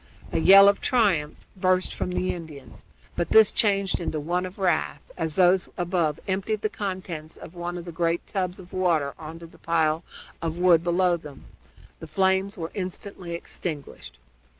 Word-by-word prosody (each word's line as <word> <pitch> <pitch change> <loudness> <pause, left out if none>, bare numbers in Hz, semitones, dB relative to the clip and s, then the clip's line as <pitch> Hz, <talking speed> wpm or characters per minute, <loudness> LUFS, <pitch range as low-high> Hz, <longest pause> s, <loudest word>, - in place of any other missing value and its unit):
A - - 0
yell 195 +3 +8
of 200 - +3
triumph 190 -12 +2 0.2
burst 185 0 +1
from - - -3
the 180 0 -1
Indians, 145 -8 -10 0.3
but 170 - -1
this 220 -1 +6
changed 200 -3 +1
into 160 -3 -3
one 175 +4 -1
of 185 - -13
wrath 180 -5 0 0.2
as 160 -3 -2
those 185 0 +4
above 175 -4 0
emptied 200 +3 -2
the 215 - +1
contents 185 -6 -5
of 165 - -11
one 175 0 -5
of 170 - -7
the 175 - -7
great 170 0 -1
tubs 185 -1 -3
of 180 -1 -14
water 165 -6 +1
on 160 +1 -8
to 170 - -11
the 165 - -17
pile 160 -1 +1 0.4
of 165 0 -3
wood 175 -2 +4
below 175 0 +2
them. 150 -4 -12 0.5
The 160 - -9
flames 190 +5 +1
were 165 -1 -5
instantly 185 -2 -5
extinguished. 150 - -6
175 Hz, 175 wpm, -25 LUFS, 160-190 Hz, 0.5 s, yell